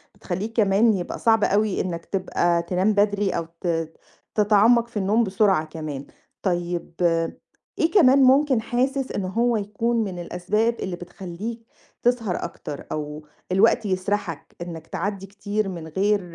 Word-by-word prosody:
بتخلّيه 200 +5 -4
كمان 215 +1 +4
يبقى 180 -3 -4
صعب 225 -2 +3
أوي 205 0 +2
إنّك 170 -2 -4
تبقى 175 -3 0
تنام 185 +4 +1
بدري 205 -1 +2
أو 165 -1 -3
ت 165 -2 -1 0.4
تتعمَّق 220 +3 +4
في 235 - -8
النوم 210 +4 +2
بسرعة 190 -5 +2
كمان. 155 -3 -6 0.4
طيب، 175 -2 -2 0.9
إيه 325 - +2
كمان 275 -8 +6
ممكن 265 -2 +4
حاسِس 265 +3 -1
إن 200 - -2
هو 230 +5 +1
يكون 225 +3 0
من 185 -3 -5
الأسباب 205 +7 0
اللي 185 -2 -3
بتخلّيك 190 +6 -7 0.4
تسهر 235 -6 +1
أكتر، 150 -4 -7
أو 150 0 -5 0.3
الوقت 210 +3 +4
يسَرحَك 185 -3 -2
إنّك 165 -2 -7
تعدّي 195 +1 -3
كتير 200 +1 -3
من 170 -3 -6
غير 200 +5 +1
200 Hz, 140 wpm, -24 LUFS, 175-225 Hz, 0.9 s, كمان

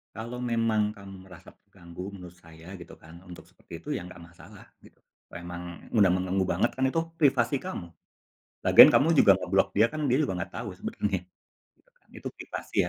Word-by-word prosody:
Kalau 115 +3 -7
memang 115 -3 0
kamu 95 -2 -12
merasa 90 -3 -14
terganggu 85 +2 -11
menurut 90 -2 -12
saya 85 +2 -13
gitu 85 - -12
kan, 80 +2 -15
untuk 90 -2 -13
seperti 85 - -12
itu - - -14
ya 85 - -9
nggak 90 -1 -12
masalah 85 0 -15 0.2
gitu. - - -22 0.3
Memang 85 0 -9
udah 105 -4 +4
mengganggu 95 +1 -1
banget 120 - 0
kan 130 0 -1
itu 150 +5 0 0.2
privasi 135 -3 +2
kamu. 130 - -7 0.7
Lagian - - +9
kamu 155 +4 +4
juga 100 - +7
nge-block 95 +1 0
dia 110 +3 +3
kan 155 -1 -3
dia 130 +3 +2
juga 95 -11 -2
nggak 85 - -6
tahu - - -5
sebenernya. 100 -2 -2 0.6
Itu - - -34
kan - - -37
itu - - -8
privasi - - -9
95 Hz, 180 wpm, -27 LUFS, 90-115 Hz, 0.7 s, Lagian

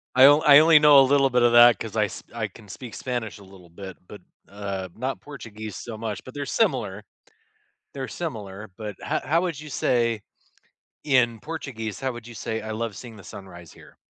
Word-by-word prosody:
I 130 +1 +8
o 145 +2 +6
I 145 -2 +8
only 160 0 +7
know 150 -2 +7
a - - +7
little 135 -1 +3
bit 125 0 +2
of 120 0 +4
that 120 0 +7
'cause 110 -1 -7
I 105 - +3
s 105 - -6
I 110 -2 -2
can 105 +1 -17
speak 120 +3 -9
Spanish 120 -5 -4
a 100 - -15
little 95 -3 -17
bit, 95 +1 -10
but, 105 - -11 0.3
uh, 100 -2 -5
not 130 +3 -4
Portuguese 110 -7 -9
so 115 -2 -7
much, 110 -2 -5
but 130 - -12
they're 145 0 -4
similar. 120 - -1 0.9
They're 130 -2 -5
similar, 110 - -7
but 105 -3 -7
ho - - -1
how 165 +5 +1
would 170 -6 -3
you 150 -1 -10
say 115 -5 0 0.8
in 125 -5 +2
Portuguese, 130 -9 -6
how 135 -1 -1
would 120 -1 -10
you 120 - -11
say, 110 0 -4
"I 110 - -5
love 110 -1 -4
seeing 115 -3 -10
the 100 - -13
sunrise 85 -4 -12
here"? - - -18
115 Hz, 210 wpm, -24 LUFS, 105-135 Hz, 0.9 s, I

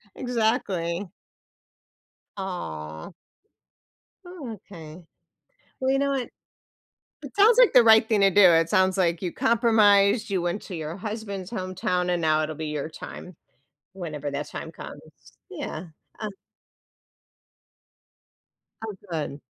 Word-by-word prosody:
Exactly. 205 -7 -1 1.3
Aw. 80 - -6 1.1
Oh, 350 -9 -8 0.2
okay. 160 -1 -10 0.8
Well, 260 0 +1
you 270 - +2
know 280 0 +1
what? 265 -3 -2 0.9
It - - -9
sounds 440 +4 +6
like - - +7
the 250 - +8
right 220 0 +7
thing 215 -3 +2
to 195 0 +5
do, 205 +2 +4
it 165 0 +3
sounds 190 -1 +2
like 170 -2 +1
you 180 -2 -2
compromised, 215 -2 +4
you 190 -3 0
went 175 +4 -2
to 185 - -7
your 160 +2 -5
husband's 200 -2 -6
hometown, 185 -3 -2
and 175 -1 0
now 155 -1 +2
it'll 155 0 -3
be 160 - -4
your 150 0 -3
time, 180 +3 -9 0.6
whenever 150 -6 -5
that 145 +1 -4
time - - -7
comes. - - -11 0.4
Yeah, 155 +4 -6 0.3
uh 215 - -3 2.6
Oh, 215 - -5 0.2
good. 150 -3 -4
190 Hz, 125 wpm, -25 LUFS, 165-220 Hz, 2.6 s, the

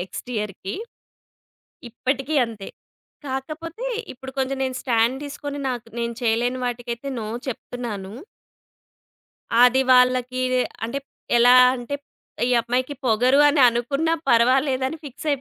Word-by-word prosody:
Next 185 +6 -7
ఇయర్‌కి. 200 -2 -4 1.2
ఇప్పటికీ 270 +5 -2
అంతే. 220 -4 -9 0.6
కాకపోతే 315 - -5 0.2
ఇప్పుడు 265 +1 -10
కొంచెం 265 0 -1
నేను 260 -1 -2
స్టాండ్ 235 +1 +2
తీసుకొని 285 0 -6
నాక్ 245 -2 -4
నేను 235 0 -2
చేయలేని 240 +2 +1
వాటికైతే 240 +1 -4
నో 215 - -5 0.2
చెప్తున్నాను. 225 -5 -6 1.5
అది 250 +2 +5
వాళ్ళకిదే 255 0 +3 0.2
అంటే 275 +5 -3 0.4
ఎలా 245 +1 +7 0.2
అంటే 250 +3 -4 0.5
"ఈ - - 0
అమ్మాయికి 255 +4 -1
పొగరు" 250 +4 +4
అని 285 -2 +3
అనుకున్నా 275 +8 0 0.2
పర్వాలేదని 260 +4 +3
ఫిక్స్ 280 +3 -8
255 Hz, 110 wpm, -23 LUFS, 235-270 Hz, 1.5 s, ఎలా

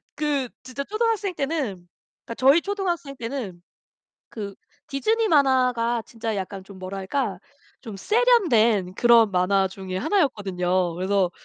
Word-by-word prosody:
그 290 -4 -1
진짜 255 +2 -5
초등학생 430 +1 -1
때는 275 - -3 0.4
그니까 230 - -6
저희 275 +6 +5
초등학생 350 -8 -3
때는 230 -8 -5 0.7
그 205 -3 -7 0.3
디즈니 440 +11 0
만화가 250 - +2
진짜 225 -2 -4
약간 195 0 -5
좀 195 0 -13
뭐랄까? 195 +3 -3 0.4
좀 220 -6 -8
세련된 235 - +3
그런 230 -1 +5
만화 190 +1 +2
중에 190 -1 -7
하나였거든요. 185 - 0
그래서 185 +1 +1
235 Hz, 285 characters per minute, -24 LUFS, 195-290 Hz, 0.7 s, 저희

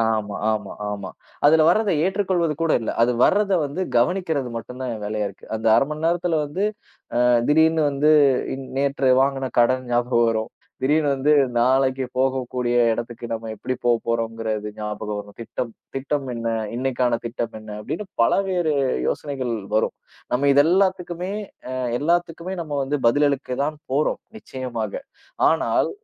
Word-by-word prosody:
ஆமா, 110 -2 0
ஆமா, 105 -2 -2 0.2
ஆமா. 100 -2 -5 0.4
அதுல 155 +1 +6
வர்றதை 200 +1 +3
ஏற்றுக்கொள்வது 185 -4 +1
கூட 165 -1 +2
இல்ல. 115 - -2
அது 120 - +4
வர்றத 200 0 +3
வந்து 145 +6 -4 0.2
கவனிக்கிறது 150 0 +1
மட்டும்தான் 125 +2 -5
வேலையா 105 0 -2
இருக்கு. 100 - -15
அந்த 110 - -5
1/2 135 - +4
மணி 155 +1 -4
நேரத்துல 170 -1 +1
வந்து 150 +7 -4 0.6
அ, - - +5 0.3
திடீர்னு 160 +1 +4
வந்து 145 +2 +2 0.4
இன் 135 0 -7
நேத்து 140 -1 +1
வாங்குன 135 -1 +1
கடன் 130 +2 +3
ஞாபகம் 120 0 +2
வரும், 110 -1 -1 0.3
திடீர்னு 150 +2 +2
வந்து 140 +3 +2 0.3
நாளைக்கு 130 +2 +2
போகக்கூடிய 125 -2 0 0.2
இடத்துக்கு 120 +1 -5
நம்ம 115 0 -4
எப்படி 130 - -3
போபோறோங்குறது 115 -2 -1
ஞாபகம் 105 0 -4
வரும். 105 0 -14
திட்டம் 115 0 -5 0.2
திட்டம் 140 +1 -2
என்ன, 115 0 -3 0.3
இன்னைக்கான 125 -2 0
திட்டம் 115 0 -4
என்ன? 110 - -11
அப்படின்னு 170 - -5 0.2
பல - - +3 0.2
வேறு 175 -4 +1 0.4
யோசனைகள் 130 -5 -2 0.2
வரும். 110 - 0 0.4
நம்ம 140 +3 +3
இதெல்லாத்துக்குமே 180 +3 +2 0.4
அ, - - -4 0.3
எல்லாத்துக்குமே 170 +3 0
நம்ம 150 -2 -8
வந்து 145 +2 -1
பதில் 145 +4 +3
அளிக்க 135 -1 -2
தான் 155 +1 -3
போறோம் 145 +3 +1 0.2
நிச்சயமாக. 125 - -5 0.6
ஆனால், - - +1
130 Hz, 145 wpm, -23 LUFS, 115-155 Hz, 0.6 s, அதுல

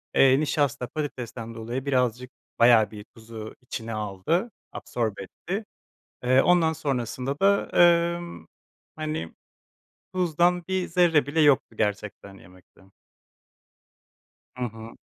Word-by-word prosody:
eee, 135 0 +6
nişasta 145 -3 0
patatesten 120 -6 -6
dolayı 120 +4 -5
birazcık 125 -2 0 0.3
bayağı 115 -2 +6
bir 105 -1 -9
tuzu 110 -1 -9
içine 115 -2 -6
aldı, 110 - -1 0.2
absorbe 110 -5 -3
etti. 195 - -6 0.6
Eee, 130 +2 +5
ondan 170 -1 +3
sonrasında 135 -2 -3
da, 200 +1 +3
ııı, 170 - +3 0.5
hani 155 - -4 0.8
tuzdan 175 0 +2
bir 190 -1 -1
zerre 165 -5 +3
bile 150 +3 0
yoktu 140 -6 +3
gerçekten 105 -2 -3
yemekte. 90 +1 -20 1.8
Hı 125 - -2
hı. 115 -1 -8
130 Hz, 110 wpm, -25 LUFS, 115-160 Hz, 1.8 s, eee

